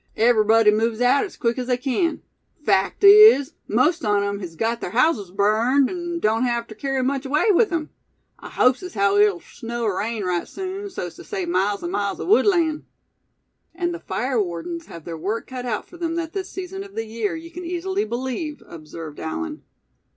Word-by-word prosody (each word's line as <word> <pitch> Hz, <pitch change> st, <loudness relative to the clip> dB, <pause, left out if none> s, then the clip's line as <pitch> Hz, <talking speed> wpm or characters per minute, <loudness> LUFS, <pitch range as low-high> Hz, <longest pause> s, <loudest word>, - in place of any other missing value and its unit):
Everybody 225 Hz, -1 st, +5 dB
moves 220 Hz, +1 st, 0 dB
aout 280 Hz, +10 st, +2 dB
quick 235 Hz, 0 st, 0 dB
as 250 Hz, -, -4 dB
they 250 Hz, -1 st, +1 dB
can; 275 Hz, +7 st, -1 dB, 0.4 s
fact 195 Hz, -, +1 dB
is, 400 Hz, -8 st, +8 dB
most 300 Hz, +10 st, +2 dB
on 205 Hz, -2 st, +2 dB
'em 200 Hz, 0 st, -2 dB
hes 175 Hz, -4 st, -8 dB
gut 230 Hz, +6 st, -1 dB
ther -, -, -3 dB
houses 240 Hz, -, +1 dB
burned, 220 Hz, +8 st, +2 dB
an' 345 Hz, -1 st, -4 dB
doan't 225 Hz, -4 st, +1 dB
hev 235 Hz, -1 st, -1 dB
ter 220 Hz, -, -11 dB
kerry 270 Hz, +3 st, -2 dB
much 270 Hz, +1 st, -1 dB
away 295 Hz, +10 st, +2 dB
with 415 Hz, +2 st, +3 dB
'em. 325 Hz, -3 st, -2 dB, 0.5 s
I -, -, -10 dB
hopes 255 Hz, 0 st, +2 dB
as 365 Hz, -1 st, -8 dB
haow 200 Hz, 0 st, +2 dB
it'll 205 Hz, -5 st, +3 dB
snow 235 Hz, 0 st, -6 dB
er 195 Hz, -3 st, 0 dB
rain 220 Hz, 0 st, -2 dB
right 180 Hz, -2 st, -1 dB
soon, 385 Hz, +1 st, -6 dB
so's 375 Hz, -, -6 dB
tew -, -, -10 dB
save 385 Hz, -4 st, -4 dB
miles 205 Hz, -, 0 dB
an' 345 Hz, -, -3 dB
miles 200 Hz, -, -2 dB
o' -, -, -4 dB
woodland." 345 Hz, -6 st, +3 dB, 0.9 s
"And 345 Hz, 0 st, -1 dB
the 345 Hz, -, -6 dB
fire 255 Hz, -7 st, -1 dB
wardens 200 Hz, -, -5 dB
have 165 Hz, -2 st, -11 dB
their 165 Hz, -2 st, -6 dB
work 205 Hz, +7 st, -3 dB
cut 250 Hz, -1 st, -6 dB
out 215 Hz, -3 st, -3 dB
for 350 Hz, -, -14 dB
them 335 Hz, -1 st, -2 dB
at 330 Hz, -1 st, -4 dB
this 380 Hz, -1 st, -4 dB
season 380 Hz, +1 st, -6 dB
of 395 Hz, -, -14 dB
the 225 Hz, -, -3 dB
year, 220 Hz, +1 st, -3 dB
you 330 Hz, +1 st, -9 dB
can 355 Hz, +1 st, -8 dB
easily 370 Hz, +3 st, -2 dB
believe," 265 Hz, -, -4 dB
observed 155 Hz, -1 st, -9 dB
Allan. 305 Hz, -, -4 dB
255 Hz, 200 wpm, -22 LUFS, 210-340 Hz, 0.9 s, is